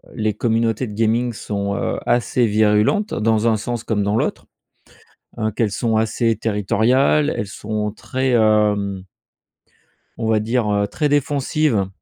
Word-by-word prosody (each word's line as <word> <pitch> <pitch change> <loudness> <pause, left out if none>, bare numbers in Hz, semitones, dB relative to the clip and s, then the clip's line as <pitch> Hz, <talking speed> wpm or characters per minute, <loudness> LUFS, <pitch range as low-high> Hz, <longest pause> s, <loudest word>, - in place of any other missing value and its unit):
les 110 -2 0
communautés 115 +2 0
de 105 - -8
gaming 115 +2 0
sont, 100 -2 -3
heu, - - -2
assez 120 0 +1
virulentes 110 - +2
dans 110 +1 +1
un 110 -1 +3
sens 120 +1 -4
comme 105 -3 -1
dans 105 +2 0
l'autre. - - -2 0.9
Heu, 110 -1 -1
qu'elles 105 -1 -1
sont 110 +1 0
assez 115 +1 +1
territoriales, 115 +8 +2
elles 105 - -3
sont 105 0 -4
très, 130 +4 -3
hem 105 -4 +2 1.1
on 115 - -2
va 110 -1 +3
dire, 115 0 0
heu, 100 0 +1
très 150 +5 -1
défensive, 140 -6 +1
110 Hz, 145 wpm, -20 LUFS, 105-120 Hz, 1.1 s, un